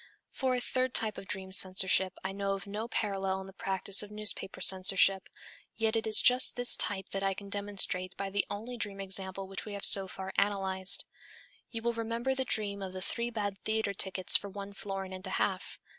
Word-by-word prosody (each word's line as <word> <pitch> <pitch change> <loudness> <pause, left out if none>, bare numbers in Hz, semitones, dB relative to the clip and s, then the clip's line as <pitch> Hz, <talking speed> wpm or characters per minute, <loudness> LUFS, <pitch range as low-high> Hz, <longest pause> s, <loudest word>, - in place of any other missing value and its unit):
For 260 -2 -1
a - - -1
third 255 0 -2
type 215 -2 +1
of 195 - -11
dream 190 -1 -3
censorship 190 0 +4
I 190 - -3
know 195 0 -2
of 195 - -6
no 210 +3 -5
parallel 195 -4 -2
in - - -9
the 195 - -11
practice 195 +1 +2
of 210 - -4
newspaper 210 -2 -1
censorship, 190 0 +4 0.5
yet 225 0 0
it 225 0 -1
is 215 - +6
just 250 +1 +5
this 245 0 +3
type 195 -2 -2
that 195 - -3
I 195 -1 0
can 200 +1 -10
demonstrate 200 -2 -2
by 195 0 -4
the 200 +1 +1
only 230 +4 -6
dream 205 -4 -2
example 190 0 -2
which 195 0 -4
we 210 - -7
have 200 - +2
so 195 -1 +4
far 190 0 -7
analyzed. 190 -2 +2 0.6
You 225 -1 -6
will 235 0 0
remember 230 +3 -2
the 265 0 -2
dream 200 -4 -1
of 190 -1 -6
the 185 - -6
"three 235 0 -3
bad 205 -4 -4
theatre 220 -2 -1
tickets 190 -1 +1
for 200 - +2
one 200 0 -8
florin 195 -1 -6
and 185 0 -7
a - - -3
half." - - -2
200 Hz, 210 wpm, -30 LUFS, 190-220 Hz, 0.6 s, is